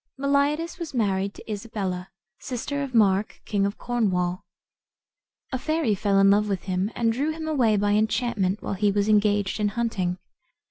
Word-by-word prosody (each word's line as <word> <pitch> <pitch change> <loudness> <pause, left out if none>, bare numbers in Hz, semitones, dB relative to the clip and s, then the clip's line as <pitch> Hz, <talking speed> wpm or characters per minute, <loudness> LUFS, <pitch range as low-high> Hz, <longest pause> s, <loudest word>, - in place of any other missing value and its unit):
Meliadus 285 +5 0
was 330 -5 -6
married 200 -3 0
to - - -13
Isabella, 195 -4 -4 0.3
sister 275 +3 -4
of 270 -3 -4
Mark, 200 -2 +3
king 200 -1 +1
of 200 - -5
Cornwall. 185 -7 -1 1.1
A 260 - -2
fairy 310 -6 0
fell 200 0 +1
in 195 0 +6
love 210 +1 +3
with 195 -3 -2
him, 185 +1 -1
and 230 -1 +1
drew 280 +6 -1
him 315 0 -5
away 245 -9 +2
by 205 0 +1
enchantment 210 -2 0
while - - -2
he 205 +1 +2
was 205 0 +1
engaged 205 -1 +2
in 210 - +2
hunting. 200 -5 -1
210 Hz, 170 wpm, -25 LUFS, 195-245 Hz, 1.1 s, in